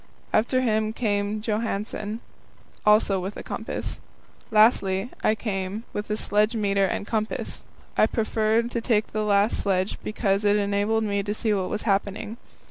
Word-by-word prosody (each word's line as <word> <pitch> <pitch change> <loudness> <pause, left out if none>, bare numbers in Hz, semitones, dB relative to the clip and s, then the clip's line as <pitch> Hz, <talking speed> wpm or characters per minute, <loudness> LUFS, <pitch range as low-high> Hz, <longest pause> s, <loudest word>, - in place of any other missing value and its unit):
After 255 +4 +3
him 220 -3 +1
came 210 -2 -1
Johansen, 215 0 -2 0.7
also 210 -2 +5
with 190 +3 -5
a - - -6
compass. - - -5 0.5
Lastly, 215 -2 +3
I 215 - +3
came, 200 -1 -3
with 205 +1 -3
sledge 210 +3 +1
meter 200 -2 +2
and 195 - -2
compass. 215 0 -2 0.3
I - - +5
preferred 225 +1 +1
to 235 - -1
take 215 -2 +2
the 215 0 -1
last 205 +1 +3
sledge 190 -1 0
because 205 -2 0
it 205 0 +4
enabled 205 +2 +1
me 200 -1 0
to 205 +1 -3
see 220 -1 +1
what 190 -2 -1
was 210 - -2
happening. 205 +2 -1
210 Hz, 150 wpm, -25 LUFS, 200-220 Hz, 0.7 s, also